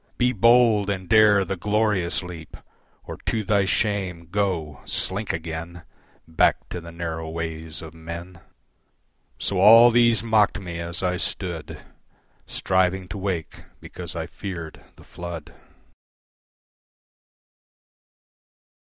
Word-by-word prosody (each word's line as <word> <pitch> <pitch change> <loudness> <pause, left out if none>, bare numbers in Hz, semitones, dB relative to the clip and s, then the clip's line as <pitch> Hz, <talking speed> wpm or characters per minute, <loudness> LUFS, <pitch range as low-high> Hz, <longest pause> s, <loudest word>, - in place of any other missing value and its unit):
Be 125 0 +3
bold 115 -2 +4
and 95 -2 -3
dare 105 -2 +5
the 95 +2 -3
glorious 105 -2 0
leap, 85 -3 -9 0.5
Or - - -8
to 110 -2 0
thy 100 0 +2
shame, 95 -5 -1
go, 90 -8 -1
slink 100 +3 -2
again 80 +1 -6 0.4
Back 80 - +2
to 90 - -5
the 85 0 -10
narrow 80 -1 -5
ways 80 -1 -5
of 80 -1 -10
men." 85 +2 -9 1.0
So 95 - -1
all 115 +5 +8
these 120 -1 +4
mocked 110 -3 +3
me 85 -3 -6
as 85 +1 -4
I 90 0 0
stood 85 -4 -3 0.6
Striving 95 0 0
to 100 - -6
wake 95 -4 -4 0.2
because 90 0 -9
I 80 -1 -3
feared 85 -3 -8
the - - -17
flood. 85 -2 -8
90 Hz, 120 wpm, -24 LUFS, 85-105 Hz, 1.0 s, all